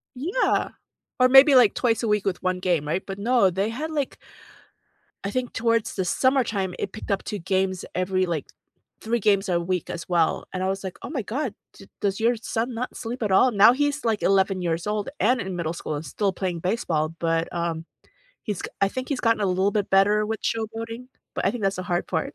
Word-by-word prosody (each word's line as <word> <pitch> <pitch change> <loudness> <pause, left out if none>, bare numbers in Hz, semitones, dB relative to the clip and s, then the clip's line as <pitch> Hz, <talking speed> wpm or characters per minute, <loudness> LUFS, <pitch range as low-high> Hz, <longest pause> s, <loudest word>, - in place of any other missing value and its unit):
Yeah, 360 - 0 0.5
or 255 0 +5
maybe, 270 +1 +8
like, 240 -5 +6
twice 230 -2 +1
a - - 0
week 210 -1 +1
with 195 -3 -1
1 185 0 0
game, 170 -5 0
right? 175 +5 -1
But, 195 0 -6
no, 230 -2 +3
they 195 +4 -1
had, 300 +8 -4
like 290 -4 -2 1.1
I 200 - -2
think 255 -1 -2
towards 230 -1 0
the 190 -2 -1
summertime, 225 -6 +1
it 200 - -3
picked 215 - -6
up 195 - 0
2 210 - -4
games 190 0 -1
every, 185 +1 0
like, 165 -5 -3 0.5
3 235 +2 0
games 200 -2 +2
a 170 -1 +2
week 180 0 -2
as 165 - -6
well, 170 -2 +1
and 185 - -3
I - - 0
was 195 +1 -2
like, 190 - -6
"Oh - - -7
my 275 -7 -3
god, 245 +2 -3 0.2
d 195 - -15
does 195 -1 0
your 235 +2 +3
son 230 +2 -3
not 250 +2 -4
sleep 240 +1 -5
at 205 - -1
all?" 250 +7 +5
Now 215 +2 +7
he's, 290 0 -1
like, 220 -2 +1
11 190 -1 +2
years 165 -1 -1
old 210 -1 -1
and 245 +3 +3
in 190 -3 -4
middle 165 -2 -2
school 155 -2 -4
and 145 +2 -5
still 200 -3 -1
playing 180 -2 -3
baseball, 165 -5 0
but, 165 0 0
um, 170 -1 -2 0.6
he's 205 -4 -4
g - - -4
I 195 - +4
think 255 +5 -5
he's 280 -3 -2
gotten 230 -2 +2
a 200 - +2
little 190 +2 +2
bit 205 -1 -1
better 205 +2 +4
with 220 0 -3
showboating, 225 +2 -3 0.3
but - - -2
I - - +4
think 235 -3 -6
that's 195 0 +1
the 185 - -4
hard 175 0 -1
part. 160 -3 -2
200 Hz, 225 wpm, -24 LUFS, 185-230 Hz, 1.1 s, maybe